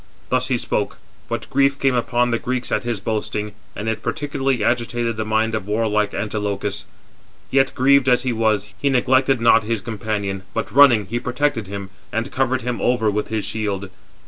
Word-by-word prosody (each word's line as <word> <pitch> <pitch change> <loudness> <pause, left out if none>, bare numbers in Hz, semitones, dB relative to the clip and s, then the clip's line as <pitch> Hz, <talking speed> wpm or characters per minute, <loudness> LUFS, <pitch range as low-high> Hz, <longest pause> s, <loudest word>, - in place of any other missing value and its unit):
Thus 130 0 +1
he 130 -2 +1
spoke; 105 -3 -2 0.3
but - - -3
grief 140 0 +3
came 135 -1 +2
upon 120 0 +1
the 115 - +1
Greeks 125 0 -3
at - - +1
his 120 -3 -2
boasting, 105 0 -3 0.2
and 105 - -5
it 110 -1 -1
particularly 135 -5 -1
agitated 120 0 0
the 110 0 -3
mind 110 +1 +1
of 110 -3 -3
warlike 105 -1 0
Antilochus. 105 -1 -3 0.7
Yet, 135 0 +3
grieved 135 +1 +4
as 125 0 +3
he 125 -2 0
was, 105 -3 0
he 140 - +1
neglected 130 0 +3
not 115 0 +5
his 115 +1 -1
companion, 105 -3 -3
but - - -2
running, 125 -6 +6
he 115 +5 -2
protected 125 -3 -1
him, 100 -1 -6 0.2
and 115 +1 -2
covered 130 -1 0
him 125 0 -3
over 115 -4 +2
with 105 +1 -2
his 110 -2 -2
shield. 100 -3 -3
115 Hz, 180 wpm, -21 LUFS, 105-125 Hz, 0.7 s, running